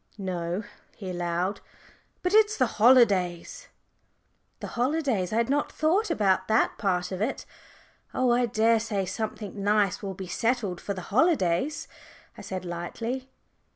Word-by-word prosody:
"No," 180 0 -3 0.3
he 190 -3 -6
allowed, 175 +3 -2 0.6
"but 360 +2 0
it's 430 0 +5
the 255 - +4 0.2
holidays." 215 - +3 0.9
The - - -6
holidays! 250 - 0
I - - -1
had 230 0 +2
not 290 +2 0
thought 365 +8 +1
about 190 -2 +1
that 220 +1 +2
part 180 -3 0
of 185 +1 -4
it. 235 +6 -2 0.7
"Oh, 255 -1 +1
I 240 0 +3
daresay 220 -3 +1
something 205 +1 -5
nice 205 -2 +2
will 195 -2 -5
be 190 - -6
settled 215 -2 -1
for 200 - -4
the 185 - -5
holidays," 270 - +2 0.5
I - - -10
said 185 -1 -6
lightly. 230 +10 -5
210 Hz, 140 wpm, -27 LUFS, 185-250 Hz, 0.9 s, it's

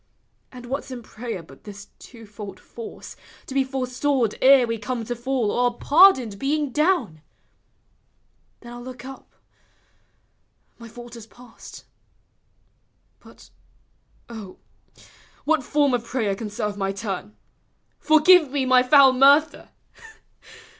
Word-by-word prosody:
And 250 -1 -11
what 265 +3 -4
's - - -15
in 250 -2 -8
prayer 220 -5 -7
but 135 -4 -18
this 205 -1 -11
twofold 210 -4 -11
force, 230 -1 -11 0.3
To - - -9
be 270 0 +2
forestalled 260 -2 -1
ere 265 -1 +6
we 230 -1 -4
come 235 +1 -4
to 240 - -4
fall. 240 -3 -2
Or 245 -1 0
pardoned 280 - +4
being 290 0 -1
down? 295 - 0 1.4
Then 240 - -12
I - - -9
'11 240 - -10
look 255 -1 -10
up; 270 0 -12 1.4
My 230 - -11
fault 240 +1 -12
is 225 -2 -12
past. 240 0 -15 1.3
But, - - -18 0.8
O, 215 -5 -10 0.9
what 315 -3 +1
form 285 +1 +1
of 240 -2 -1
prayer 230 -5 -2
Can 210 +2 -6
serve 205 0 -4
my 195 -1 -2
turn? 200 +1 -6 0.3
" - - -46
Forgive 310 +1 +5
me 275 -1 -1
my 255 -1 +5
foul 265 +1 +6
mur 275 +3 +6
der?" - - -16
245 Hz, 135 wpm, -23 LUFS, 220-270 Hz, 1.4 s, ere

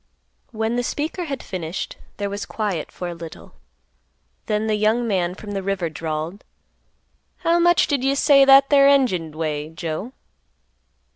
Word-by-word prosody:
When 225 0 -2
the 245 - 0
speaker 315 +7 -3
had 275 -4 -5
finished, 175 -1 -5 0.2
there 205 - -2
was 200 +1 -5
quiet 200 -8 -3
for 180 - -6
a 175 - -4
little; 165 -1 -11 0.9
then 215 0 0
the 220 - 0
young 215 +3 +1
man 180 -4 0
from 205 +1 -9
the 195 -1 -2
river 190 -4 -2
drawled, 160 +4 -4 1.0
"How 340 0 +3
much 345 0 +4
did 280 -4 -1
you 270 +1 +2
say 280 -1 +5
that 275 +1 +6
there 275 -1 +6
engine 250 - +3
'd 155 - -16
weigh, 155 -1 -3
Joe?" 165 +8 -5
210 Hz, 160 wpm, -22 LUFS, 170-270 Hz, 1.0 s, that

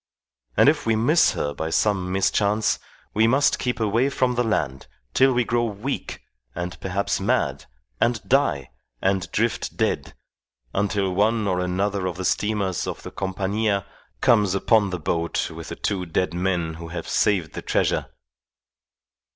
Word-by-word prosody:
And - - +6
if 145 -3 +3
we 115 - +3
miss 150 +10 +4
her 75 - -2
by 80 +2 -3
some 95 +1 +1
mischance, 100 +2 +1 0.3
we 110 +2 +4
must 140 +4 +3
keep 125 -1 -1
away 115 +5 +2
from 130 -2 +1
the 120 0 +1
land 70 - -1 0.3
till 135 0 +5
we 125 -1 +2
grow 120 +1 +1
weak, 115 +5 -4 0.3
and 90 +1 -4
perhaps 95 +1 -1
mad, 95 - 0 0.3
and 115 -1 +2
die, 130 - +2 0.3
and 95 0 0
drift 115 +2 -1
dead, - - -1 0.6
until 100 -1 0
one 105 +2 +2
or 90 -2 +1
another 95 +2 -1
of 90 -1 -4
the 95 - -4
steamers 100 -4 0
of - - -5
the - - -7
Compania 100 +1 -1 0.4
comes 105 -6 +4
upon 105 0 +3
the 90 - -3
boat 85 +1 -1
with - - -8
the - - -5
two 95 -3 -2
dead 90 +2 0
men 90 -2 -1
who 85 +1 -8
have 85 0 -6
saved 95 -7 +1
the - - -5
treasure. - - 0
100 Hz, 160 wpm, -24 LUFS, 90-115 Hz, 0.6 s, And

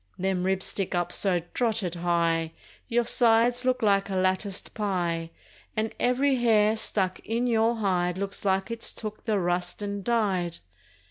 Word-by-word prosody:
Them 185 -1 -1
ribs 190 0 +1
stick 195 -2 -2
up 175 0 -1
so 180 -4 +1
drotted 220 -7 0
high 170 -2 0 0.3
Your 240 -1 +1
sides 240 +2 +3
look 255 -2 +1
like 200 -1 +3
a 195 - -2
latticed 185 +1 -1
pie, 175 -5 -1 0.5
And 220 0 -1
every 260 +2 +2
hair 220 -3 +3
stuck 190 -4 0
in 230 +2 -2
your 230 -1 +2
hide 180 -4 0
Looks 200 0 -4
like 195 +2 0
it's 230 0 -3
took 215 -1 -6
the 215 -2 +1
rust 175 +1 -1
and 200 -1 -4
died! 190 -7 0
200 Hz, 155 wpm, -27 LUFS, 180-225 Hz, 0.5 s, sides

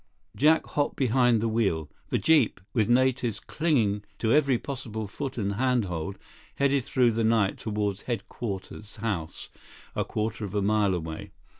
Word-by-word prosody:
Jack 155 +4 +4
hopped 145 -1 -1
behind 125 -3 +3
the 115 - +1
wheel. 100 -9 0 0.2
The - - +1
jeep, 150 -11 +3
with 110 -2 +2
natives 125 -2 +2
clinging 115 -11 0
to 110 0 +1
every 140 -4 +4
possible 115 -6 -5
foot 135 +7 -5
and 100 -3 -1
hand 125 0 +1
hold, 90 +2 -4 0.4
headed 140 -1 +2
through 125 -3 +3
the 115 +1 0
night 110 -3 +2
toward 105 -2 -2
Headquarters 105 -3 -5
House, 100 -8 -4 0.4
a - - +1
quarter 110 +1 -3
of 100 0 -5
a 100 - +2
mile 105 -2 +2
away. 80 -2 -5
110 Hz, 155 wpm, -27 LUFS, 100-130 Hz, 0.4 s, Jack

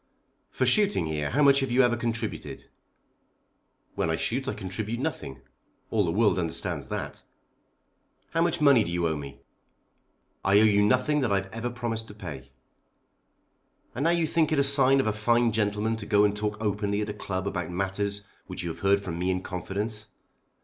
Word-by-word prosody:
"For - - -1
shooting 205 - +2
here, 75 -2 -2
how 145 +6 +2
much 140 -1 +6
have 135 -1 -1
you 125 +2 +4
ever 120 -1 +3
contributed?" 115 0 -4 1.3
"When - - -1
I 80 - +1
shoot 135 +10 -2
I - - -2
contribute 105 +4 -4
nothing. 70 - -4 0.5
All 110 -2 +2
the 85 - 0
world 105 +1 +2
understands 85 -3 -3
that." - - -5 1.1
"How 165 - +1
much 170 -1 +1
money 140 -6 +5
do 85 - -5
you 85 -1 0
owe 80 - -1
me?" 70 -2 -8 1.0
"I 100 +2 +5
owe - - +5
you 105 -2 +4
nothing 125 +8 +2
that 120 -6 0
I've 95 -1 -1
ever 115 +2 -3
promised 115 -2 -4
to 105 - -12
pay." 75 -10 -8 1.4
"And 135 +5 -2
now - - +4
you 170 -1 +2
think 160 0 +1
it 155 - +2
a 140 - +4
sign 135 -1 +4
of 135 - +1
a 110 - +1
fine 115 +2 +2
gentleman 105 +1 0
to 105 - -6
go 105 -1 +4
and 105 0 +2
talk 105 0 -2
openly 105 -1 -1
at 105 - -3
a - - -3
club 95 -2 -4
about 90 -4 -3
matters 100 +2 -2 0.2
which - - -6
you 85 - -3
have 80 - -7
heard 100 +1 +3
from 85 -3 -5
me 90 +1 0
in 95 0 -1
confidence! 105 +4 -4
105 Hz, 190 wpm, -27 LUFS, 95-120 Hz, 1.4 s, much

